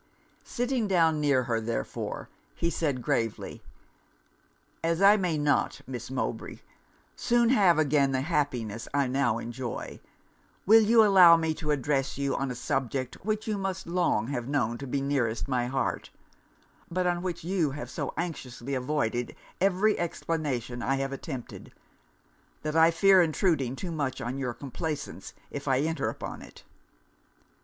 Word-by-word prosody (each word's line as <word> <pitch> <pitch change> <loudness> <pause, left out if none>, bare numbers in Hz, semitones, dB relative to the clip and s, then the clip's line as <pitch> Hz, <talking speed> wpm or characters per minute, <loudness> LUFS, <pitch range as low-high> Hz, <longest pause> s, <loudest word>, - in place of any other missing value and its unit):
Sitting 245 -2 -1
down 165 -5 +3
near 140 -3 +3
her, 115 -2 -1
therefore, 110 - -4 0.3
he 170 - -1
said, 140 -8 -1
gravely 115 -2 -2 1.2
'As 165 0 +1
I 200 +2 +7
may 180 -6 0
not, 145 -1 +1
Miss 125 -3 -6
Mowbray, 130 -1 -4 0.5
soon 240 -1 +2
have 195 -10 +5
again 145 -2 +3
the 130 -1 0
happiness 125 -8 -2
I 140 -1 +3
now 125 -3 +1
enjoy, 120 +1 -6 0.7
will 225 +3 +7
you 225 +1 +6
allow 180 -4 +8
me 160 -1 0
to 155 -1 -6
address 135 -2 0
you 140 -1 0
on 135 0 -2
a 125 - -4
subject 130 +2 -3
which 215 +2 -2
you 210 -2 -1
must 190 -2 -3
long 170 -10 0
have 125 -4 -3
known 120 -5 0
to 140 - -6
be 135 +2 -1
nearest 130 -5 -1
my 125 -2 0
heart; 130 -1 -2 0.8
but 180 +1 -1
on 175 -1 +1
which 175 -3 -4
you 175 -3 +1
have 145 +2 -7
so - - -3
anxiously 140 -6 -5
avoided 125 -3 -1 0.3
every 195 +3 +3
explanation 145 -8 -2
I 135 +3 +1
have 135 0 -2
attempted, 135 -2 -7 0.9
that 155 0 -3
I 165 0 +6
fear 190 +2 +5
intruding 155 -6 +1
too 175 +5 -5
much 145 -5 -2
on 125 +3 -4
your 125 -3 -3
complaisance 145 +2 -5 0.2
if 145 0 -6
I 135 0 +3
enter 160 +2 -1
upon - - -7
it.' - - -14
145 Hz, 150 wpm, -28 LUFS, 130-175 Hz, 1.2 s, allow